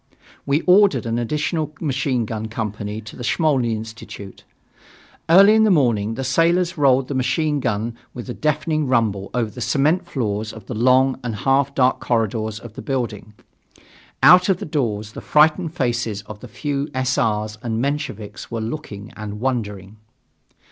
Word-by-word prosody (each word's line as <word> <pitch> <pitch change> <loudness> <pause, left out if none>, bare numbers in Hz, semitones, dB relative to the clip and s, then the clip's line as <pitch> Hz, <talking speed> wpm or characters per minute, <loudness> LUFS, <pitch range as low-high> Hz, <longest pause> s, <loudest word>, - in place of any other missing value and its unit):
We 140 +3 +2
ordered 190 -3 +4
an 115 +1 -1
additional 150 +4 -2
machine 130 -5 -1
gun 110 0 -4
company 105 -1 -4
to 110 - -11
the 125 - -8
Smolny 130 -5 +1
Institute. 110 -3 -9 0.9
Early 195 +5 +8
in 220 0 +5
the 215 - +4
morning 115 - +2
the 135 - -4
sailors 170 +6 +2
rolled 135 -3 +3
the - - -4
machine 150 +3 0
gun 115 -1 -2 0.2
with 125 - -8
a 125 - -4
deafening 155 +1 0
rumble 110 -6 0
over 115 -3 0
the 125 - -9
cement 155 +9 +1
floors 110 -7 -3
of 110 -3 -11
the - - -6
long 130 +3 +3
and 120 -3 -3
half 135 +4 +1
dark 130 -1 +3
corridors 110 -2 -1
of 120 -3 -11
the - - -8
building. 115 -6 -4 0.9
Out 180 +1 +7
of 190 - +3
the - - -6
doors 110 -8 -2
the - - -8
frightened 155 +2 +3
faces 120 - -1
of 105 0 -10
the 125 - -10
few 140 +4 -3
S. 130 0 0
R.'s 105 -1 -1
and 115 -2 -2
Mensheviks 140 -6 -4
were 115 - -3
looking 110 -4 -6
and 105 -1 -7
wondering. 105 -5 -3
125 Hz, 165 wpm, -21 LUFS, 110-150 Hz, 0.9 s, Early